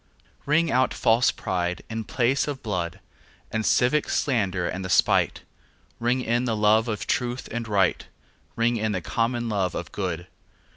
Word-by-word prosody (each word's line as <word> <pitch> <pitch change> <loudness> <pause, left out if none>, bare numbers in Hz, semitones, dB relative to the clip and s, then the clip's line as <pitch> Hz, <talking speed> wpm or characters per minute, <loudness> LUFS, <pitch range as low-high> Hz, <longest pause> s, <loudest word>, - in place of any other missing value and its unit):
Ring 155 +3 +3
out 130 0 +2
false 115 +2 +3
pride 90 -1 -2
in 110 -1 -4
place 130 +6 +1
and 145 -2 -3
blood, 90 -4 -3 0.5
The 110 0 -1
civic 125 +7 +2
slander 95 -9 0
and 95 +1 -4
the 95 - -5
spite; - - +3 0.6
Ring 125 +2 +1
in 120 +2 +1
the 115 -3 0
love 110 +2 +4
of 105 -3 -3
truth 125 0 -1
and 115 0 -3
right, 100 -3 +1 0.5
Ring 115 +1 +1
in 110 -1 -1
the 90 - -2
common 120 +5 -1
love 95 -4 -1
of - - -5
good. 90 -3 -3
115 Hz, 160 wpm, -25 LUFS, 95-125 Hz, 0.6 s, love